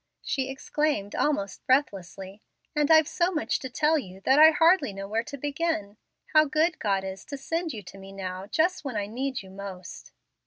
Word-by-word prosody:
she 265 -1 -2
exclaimed 270 -5 -1
almost 200 -11 -1
breathlessly; 195 -6 -1 0.3
"and 295 -1 +2
I've 315 -2 +6
so 350 +1 0
much 310 -4 -1
to 260 - -6
tell 300 +5 +2
you 190 -7 -10
that 265 +7 +4
I 315 +1 +10
hardly 325 - +3
know 195 0 -6
where 220 +3 0
to 280 +4 -8
begin. 285 -7 -2 0.4
How 310 0 +7
good 310 +3 +1
God 195 -2 0
is 190 0 -6
to 280 - -6
send 325 +4 -3
you 210 -5 -7
to 195 +2 -12
me 195 0 -11
now, 190 0 -6
just 345 - +1
when 265 -6 -4
I 205 - -1
need 255 +3 -4
you 190 - -13
most!" 190 -2 -9
260 Hz, 195 wpm, -27 LUFS, 195-310 Hz, 0.4 s, I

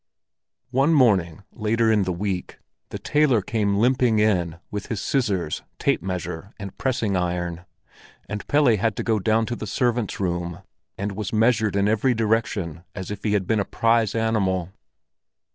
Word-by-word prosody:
One 135 +5 +3
morning 100 - +3
later 115 +1 +1
in 105 -3 +3
the 90 - -1
week, 95 0 -3 0.3
the - - -5
tailor 145 -8 +2
came 100 -2 0
limping 125 +1 +3
in 90 -6 +1
with 105 -1 -4
his 115 -6 -3
scissors, 100 - -1 0.2
tape - - +1
measure, 90 0 -5
and 100 -3 -8
pressing 120 -7 0
iron, 90 -1 -2 0.6
and 105 -1 -5
Pelle 145 -6 +4
had 110 +1 0
to - - -3
go 110 -2 +1
down 110 +2 +2
to 120 - -3
the 110 - -6
servants' 120 0 0
room, 85 -2 -3 0.3
and 100 +1 -2
was 100 0 -4
measured 110 -1 +2
in 100 0 +2
every 110 +4 +2
direction 105 -7 -1
as 95 0 -5
if 100 -1 -6
he 105 - +1
had 100 -3 +1
been 110 +3 +1
a - - +2
prize 115 0 +1
animal. 100 -6 0
105 Hz, 165 wpm, -24 LUFS, 95-115 Hz, 0.6 s, Pelle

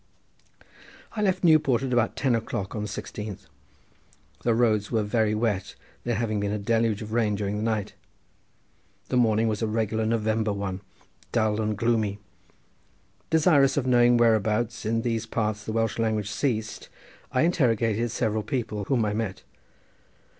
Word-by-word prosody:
I 215 - -2
left 190 -3 +1
Newport 150 -7 +4
at 130 -2 -2
about 120 -2 +1
ten 130 -3 +1
o'clock 105 -4 -3
on 105 - -3
the 105 - -3
16th, 105 0 -6 1.0
the 120 -2 +2
roads 110 -3 +2
were 110 -3 +1
very 105 0 +1
wet, 105 -4 -1 0.3
there 120 -1 -1
having 110 -1 -1
been 100 0 -1
a 105 - -1
deluge 110 0 0
of 110 +1 -7
rain 110 -3 +1
during 100 0 -2
the - - -3
night. 110 -2 -1 1.2
The 125 - +1
morning 115 -2 +3
was 110 0 -1
a 110 - +1
regular 110 0 -1
November 110 -1 0
one, 100 -2 -4 0.5
dull 110 -1 +1
and 105 -1 -1
gloomy. 110 -3 +1 1.1
Desirous 150 -4 +4
of 135 - +1
knowing 120 -1 +5
whereabouts 110 0 +1
in 115 +1 0
these 115 -2 -1
parts 105 -1 -2
the - - -3
Welsh 115 0 -1
language 110 -2 0
ceased 110 -3 -2 0.4
I 130 +3 +2
interrogated 120 - +1
several 110 -1 -1
people 110 -5 -3
whom 120 -2 +1
I 105 - -1
met. 110 -3 -3
110 Hz, 155 wpm, -26 LUFS, 105-120 Hz, 1.2 s, knowing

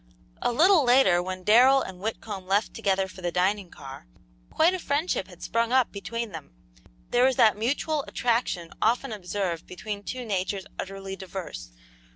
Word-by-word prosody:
A - - +1
little 330 +5 +5
later, 245 -9 +5
when 185 0 -5
Darrell 255 +6 +6
and 185 -1 -9
Whitcomb 205 -2 -5
left 200 +3 +1
together 195 -1 0
for 185 0 -12
the 175 -1 -2
dining 190 +2 0
car, 135 - -11 0.4
quite 335 +3 +3
a 370 - -2
friendship 285 - -1
had 180 -2 -14
sprung 230 0 0
up 260 -2 +3
between 230 +2 -5
them. - - -10 0.6
There 245 - +4
was 260 -1 +3
that 220 -2 +5
mutual 280 +7 -1
attraction 230 -8 -1
often 240 +3 +1
observed 185 -4 -3
between 200 +3 -6
two 250 +4 -6
natures 195 -1 -2
utterly 195 0 -5
diverse. 185 - -7
205 Hz, 165 wpm, -26 LUFS, 185-245 Hz, 0.6 s, Darrell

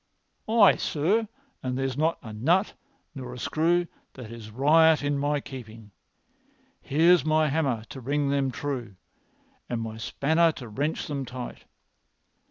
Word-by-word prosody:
"Aye, 220 -3 +6
sir, 200 +10 0 0.3
and 130 0 -3
there 135 - -1
is 130 - -2
not 160 +3 +1
a 110 - -8
nut 170 - +2 0.4
nor 125 -3 -7
a - - -9
screw 170 +6 +1 0.3
that 120 -4 -10
is 115 -2 -9
riot 155 +6 +4
in 145 0 0
my 145 +1 0
keeping. 115 -6 -10 0.9
Here's 165 +5 +4
my 155 0 +2
hammer 135 -7 0
to 130 - -8
ring 140 +3 0
them 140 -1 +1
true 125 -4 -4 0.7
and 120 - -2
my 110 -1 -5
spanner 160 +8 +2
to 125 - -9
wrench 145 +9 -2
them 140 -2 -3
tight. 125 -1 -8
140 Hz, 150 wpm, -26 LUFS, 125-160 Hz, 0.9 s, Aye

